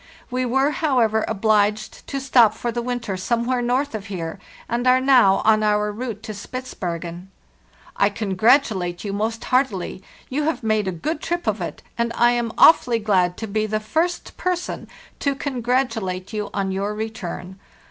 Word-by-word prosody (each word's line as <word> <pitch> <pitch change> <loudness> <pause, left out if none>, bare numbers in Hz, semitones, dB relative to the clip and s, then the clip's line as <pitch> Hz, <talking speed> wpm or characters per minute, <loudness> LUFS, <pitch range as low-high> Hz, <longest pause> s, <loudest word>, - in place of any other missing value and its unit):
We 255 0 0
were, 270 +4 +2
however, 240 -9 +2
obliged 215 0 +1
to 275 - -3
stop 245 -5 +4
for 235 +1 -3
the 240 +1 -2
winter 240 -4 -3
some 230 +6 -1
where 250 0 0
north 255 +3 0
here, 185 -2 -5 0.3
and 240 +2 -1
are 255 0 +6
now 255 -7 +5
on 215 0 +5
our 210 0 +2
route 220 -1 -5
to 215 - -5
Spitz 255 +5 -7
bergen. 175 +1 -5 0.7
"*T 200 - +5
congratulate 200 -3 +1
you 200 -2 -3
most 220 +3 -2
heartily. 250 -9 0 0.3
You 290 +3 -1
have 320 -5 -1
made 215 -2 +1
a - - 0
good 295 - -3
trip 345 +1 -2
of 215 -3 -1
it, 170 - -5 0.2
and 235 0 +1
I 240 0 +4
am 240 -1 -1
awfully 245 -7 +6
glad 190 -5 +1
to 225 - -5
be 215 +1 -1
the 215 0 -1
first 320 +11 -2
person 360 -1 -2 0.3
to 280 -1 0
congratulate 240 -8 -2
you 210 -1 -3
on 195 -1 -1
your 200 +2 -2
return. 195 -4 -6
220 Hz, 170 wpm, -22 LUFS, 200-255 Hz, 0.7 s, are